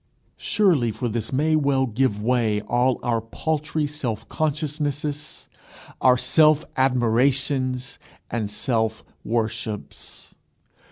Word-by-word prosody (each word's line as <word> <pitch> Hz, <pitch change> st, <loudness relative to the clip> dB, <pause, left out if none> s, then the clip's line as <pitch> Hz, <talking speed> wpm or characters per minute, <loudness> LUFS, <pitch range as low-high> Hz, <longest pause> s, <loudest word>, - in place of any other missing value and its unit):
Surely 170 Hz, -, +2 dB
for 120 Hz, +3 st, -3 dB
this 110 Hz, -1 st, -3 dB
may 155 Hz, +4 st, +2 dB
well 140 Hz, -3 st, +2 dB
give 120 Hz, -2 st, 0 dB
way 115 Hz, -3 st, +2 dB
all 125 Hz, +3 st, +1 dB
our 120 Hz, -2 st, +1 dB
paltry 155 Hz, +6 st, -2 dB
self 125 Hz, -7 st, -4 dB
consciousnesses, 150 Hz, -1 st, -3 dB, 0.5 s
our 125 Hz, -1 st, +5 dB
self 155 Hz, +3 st, +4 dB
admirations 130 Hz, +1 st, +1 dB, 0.3 s
and 110 Hz, -3 st, -2 dB
self 110 Hz, 0 st, -1 dB, 0.2 s
worships! 110 Hz, -2 st, -4 dB
130 Hz, 100 wpm, -23 LUFS, 115-150 Hz, 0.5 s, our